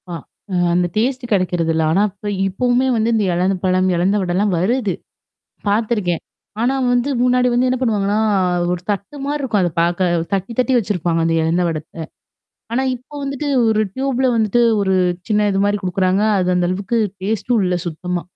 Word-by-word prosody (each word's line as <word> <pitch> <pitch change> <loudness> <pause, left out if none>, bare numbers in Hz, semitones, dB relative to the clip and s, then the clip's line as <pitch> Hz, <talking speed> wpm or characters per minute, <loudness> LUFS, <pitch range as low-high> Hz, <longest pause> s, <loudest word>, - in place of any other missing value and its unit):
அ - - -5 0.4
அ - - -1 0.2
அந்த 175 0 +2
டேஸ்ட்டு 250 +2 -1
கெடைக்கிறது 180 -4 +1
இல்ல. 160 0 +1
ஆனா 190 +5 +3
இப்ப 205 +2 -7 0.2
இப்பவுமே 245 +6 +1
வந்து 225 0 +1
இந்த 220 -2 +2
இலந்தப்பழம் 185 +1 +1
இலந்த 180 +4 +1
வடல்லாம் 185 +2 0
வருது. 210 +1 0 0.7
பாத்துருக்கேன் 205 -5 0 0.4
ஆனா 245 +3 +2 0.2
வந்து 245 +3 +1
முன்னாடி 250 0 +3
வந்து 245 +1 +2
என்னா 255 0 0
பண்ணுவாங்கன்னா? 210 -4 +1 0.5
ஒரு 180 -1 -2
தட்டு 200 +6 -3
மாரி 295 +1 -2
இருக்கும், 225 -7 0
அத 175 - +1
பாக்க. 175 +2 +1 0.2
தட்டி 195 +4 -2
தட்டி 255 +1 +2
வச்சுருப்பாங்க 175 -6 0
அந்த 165 - +1
இலந்த 165 +3 +1
வடத்த. 160 +1 -6 0.7
ஆனா 255 +3 +1
இப்போ 255 +4 -18
வந்துட்டு, 275 +1 -3 0.2
ஒரு 215 -1 +2
டியூபுல 265 -1 0
வந்துட்டு 225 +1 +2 0.2
ஒரு 190 -1 +1 0.3
சின்ன 210 -1 +2
இது 195 - 0
மாரி 205 0 +1
குடுக்குறாங்க 185 +1 +1 0.2
அது 180 -1 0
அந்த 175 -1 +1
அளவுக்கு 195 +5 -1 0.2
டேஸ்ட்டும் 220 +2 0
இல்ல 180 0 0
சுத்தமா. 175 +2 -3
200 Hz, 165 wpm, -19 LUFS, 180-240 Hz, 0.7 s, ஆனா